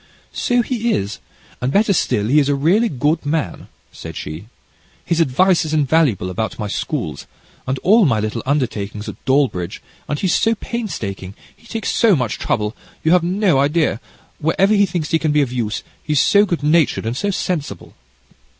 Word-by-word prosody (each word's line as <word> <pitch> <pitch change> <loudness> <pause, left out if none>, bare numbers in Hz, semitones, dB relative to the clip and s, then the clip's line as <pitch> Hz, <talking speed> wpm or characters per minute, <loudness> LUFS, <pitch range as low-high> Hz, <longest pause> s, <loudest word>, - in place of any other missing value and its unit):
"So 245 0 +1
he 235 -1 -1
is, 100 +2 -3 0.4
and, 125 +2 0
better 205 +4 +3
still, 105 - 0
he 145 +6 +4
is 145 -1 +1
a 145 - +2
really 185 +12 +2
good 150 +4 0
man," 145 - -2 0.2
said - - -9
she. 80 +7 -7 0.6
"His 170 - 0
advice 170 +6 +3
is 155 0 -2
invaluable 140 - +2
about 110 +4 -3
my 105 - -3
schools, - - -4 0.4
and 130 +1 -1
all 210 0 +5
my 115 -5 +2
little 110 +2 -2
undertakings 110 -7 -2
at - - -9
Dawlbridge, 130 -11 0 0.3
and 150 - -1
he's 185 -3 +1
so 225 0 +2
painstaking, 105 - -5 0.2
he 235 - -21
takes 225 -2 -3
so 225 -5 +4
much 125 -7 -2
trouble 105 +1 -1 0.3
you 160 - +2
have 180 0 +5
no 180 -3 +2
idea 145 - +1 0.4
wherever 185 +6 +2
he 200 -1 +4
thinks 165 -3 -3
he 165 - +3
can 155 -2 0
be 150 -1 +3
of 125 - -4
use: 110 -4 -2 0.2
he's 150 -2 0
so 205 +7 +4
good 170 -5 -2
natured 155 -5 +2
and 115 +2 -2
so 205 +10 -1
sensible." 180 -5 -3
150 Hz, 180 wpm, -19 LUFS, 120-185 Hz, 0.6 s, all